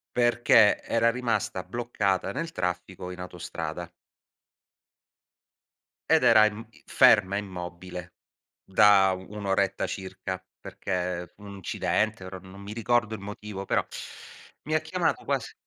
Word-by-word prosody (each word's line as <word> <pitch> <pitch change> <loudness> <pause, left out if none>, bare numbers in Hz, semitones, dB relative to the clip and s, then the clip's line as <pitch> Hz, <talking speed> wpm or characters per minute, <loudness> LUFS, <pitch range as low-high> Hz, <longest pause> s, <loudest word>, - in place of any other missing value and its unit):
Perché 120 -3 +5
era 115 0 +2
rimasta 115 -6 -1
bloccata 100 -2 -1
nel 165 +9 -4
traffico 90 - -4
in 90 - -7
autostrada. 90 -1 -6 2.2
Ed - - +5
era 110 -2 +7
im 110 +1 -3 0.2
ferma 95 +2 +5
immobile, 90 -2 -7 0.5
da 95 -1 +5
1 100 +3 -7
oretta 95 0 +1
circa, 95 0 -5 0.2
perché 90 -2 -4
un 100 -1 -10
incidente 105 +2 -1
ora 95 0 -7
non 95 +2 -13
mi 100 +1 -7
ricordo 115 0 +1
il 105 - -10
motivo, 105 -1 -7
però, - - +1 0.8
mi 155 +2 -1
ha - - +4
chiamato 180 -2 -1
quasi 135 -5 -2
100 Hz, 120 wpm, -27 LUFS, 95-110 Hz, 2.2 s, era